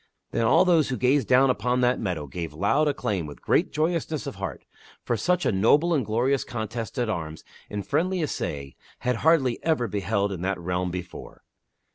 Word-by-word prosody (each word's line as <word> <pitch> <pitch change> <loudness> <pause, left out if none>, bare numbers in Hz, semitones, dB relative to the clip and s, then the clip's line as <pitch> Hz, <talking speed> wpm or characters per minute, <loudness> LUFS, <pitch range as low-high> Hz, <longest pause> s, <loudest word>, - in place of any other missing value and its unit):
Then 115 - +1
all 180 - +5
those 165 -5 +3
who 125 - -2
gazed 130 +2 +2
down 130 +1 +5
upon 125 0 0
that 125 0 +2
meadow 90 -8 -3
gave 80 +1 -6
loud 115 - +2
acclaim 100 - -1
with 75 - -10
great - - +1
joyousness 160 -1 -1
of - - -4
heart, - - -6 0.4
for 120 - 0
such 175 - 0
a - - +3
noble 145 - +3
and 145 -5 +2
glorious 120 +5 +1
contest 115 +2 -5
at 120 -2 0
arms 80 -7 -4 0.3
in 105 -1 -4
friendly 175 - 0
assay 70 - -4 0.3
had 125 -1 0
hardly 140 -4 +3
ever 155 -7 +1
been 100 0 -2
beheld 100 +1 0
in 95 - -4
all 95 +1 0
that - - -12
realm 90 +1 -2
before. 90 0 -8
120 Hz, 195 wpm, -25 LUFS, 95-145 Hz, 0.4 s, all